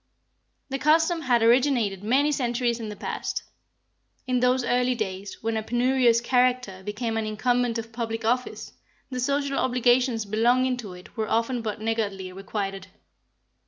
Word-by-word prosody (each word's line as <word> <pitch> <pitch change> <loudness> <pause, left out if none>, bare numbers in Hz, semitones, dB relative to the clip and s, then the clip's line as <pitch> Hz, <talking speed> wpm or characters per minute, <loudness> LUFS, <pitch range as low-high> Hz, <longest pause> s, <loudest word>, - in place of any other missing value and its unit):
This 270 0 -3
custom 320 +2 +3
had 245 -5 +2
originated 235 -5 +3
many 275 +7 +3
centuries 240 -3 0
in 220 -2 -5
the 210 - -6
past. - - -4 0.8
In 255 -1 +1
those 250 +1 +2
early 250 +1 +1
days, 195 -3 -5
when 225 0 -1
a 220 - 0
penurious 240 +1 +2
character 250 -5 +1
became 225 +3 -3
an 220 -1 -1
incumbent 245 +2 0
of 230 0 -6
public 225 -1 -3
office, 250 +2 -1 0.4
the 255 - -3
social 280 +2 0
obligations 245 -2 +2
belonging 245 +5 +2
to 210 -6 -7
it 180 0 -14
were 220 -2 -2
often 230 +2 0
but 215 -1 -4
niggardly 205 -4 -2
requited. 195 0 -5
235 Hz, 150 wpm, -25 LUFS, 215-255 Hz, 0.8 s, custom